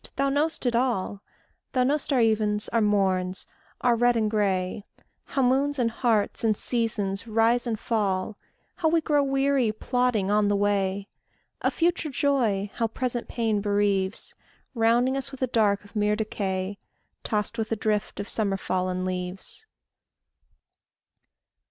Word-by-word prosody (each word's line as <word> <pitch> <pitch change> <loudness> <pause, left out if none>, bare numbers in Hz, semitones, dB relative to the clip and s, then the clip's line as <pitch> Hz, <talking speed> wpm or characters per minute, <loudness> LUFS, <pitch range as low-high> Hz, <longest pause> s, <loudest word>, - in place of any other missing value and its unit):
Thou 275 +1 +1
know'st 295 +1 0
it 240 -1 +1
all; 230 -5 0 0.5
Thou 255 -1 +3
know'st 290 +3 0
our 265 - +3
evens, 215 -2 +2
our 230 - +1
morns, 190 -3 +1 0.4
our 245 -1 +4
red 240 +1 +3
and 215 -2 +1
gray; 195 -2 0 0.4
How 270 - 0
moons, 275 +3 +2
and 235 -3 +1
hearts, 225 -3 0
and 215 -2 +2
seasons 220 -4 -1
rise 230 +2 +2
and 220 -2 -2
fall; 205 -3 -1 0.4
How 320 - +2
we 330 +1 +3
grow 300 -2 +2
weary 270 -3 +2
plodding 220 -3 0
on 210 0 +3
the 205 - +2
way; 200 -1 0 0.5
Of - - 0
future 340 -2 +1
joy 240 -8 +1
how 230 - 0
present 240 +1 -3
pain 225 -3 0
bereaves, 200 -1 0 0.4
Rounding 240 +2 +3
us 270 0 -2
with 270 -1 -6
a - - +5
dark 210 -4 +1
of 200 - -18
mere 210 0 +2
decay, 200 -2 -3 0.4
Tossed 215 +2 -2
with 220 0 -2
a - - +2
drift 210 -1 -1
Of 200 - -4
summer 200 -4 -1
fallen 185 -1 -1
leaves. 185 - -4
220 Hz, 150 wpm, -26 LUFS, 200-250 Hz, 0.5 s, a